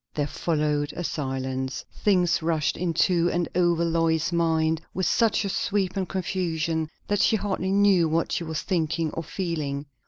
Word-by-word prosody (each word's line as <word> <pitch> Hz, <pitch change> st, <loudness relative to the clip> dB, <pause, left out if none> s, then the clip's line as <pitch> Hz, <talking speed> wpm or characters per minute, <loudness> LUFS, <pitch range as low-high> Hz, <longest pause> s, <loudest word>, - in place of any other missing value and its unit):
There 145 Hz, -, 0 dB
followed 150 Hz, -1 st, -1 dB
a 175 Hz, -, -4 dB
silence. 130 Hz, -3 st, -3 dB
Things 180 Hz, -5 st, +2 dB
rushed 160 Hz, -2 st, 0 dB
into 175 Hz, 0 st, +2 dB
and 175 Hz, -1 st, 0 dB
over 175 Hz, -1 st, +2 dB
Lois's 165 Hz, 0 st, +1 dB
mind 160 Hz, -1 st, +1 dB
with 185 Hz, -, 0 dB
such 225 Hz, -2 st, +2 dB
a -, -, -1 dB
sweep 195 Hz, -1 st, -1 dB
and 190 Hz, -2 st, -2 dB
confusion, 165 Hz, -4 st, -1 dB, 0.2 s
that 205 Hz, -1 st, +1 dB
she 220 Hz, -, +4 dB
hardly 190 Hz, -2 st, -1 dB
knew 195 Hz, -4 st, +4 dB
what 165 Hz, +1 st, 0 dB
she -, -, -1 dB
was 160 Hz, -2 st, -4 dB
thinking 165 Hz, -3 st, 0 dB
or -, -, -4 dB
feeling. 155 Hz, -5 st, -3 dB
165 Hz, 160 wpm, -25 LUFS, 155-185 Hz, 0.2 s, she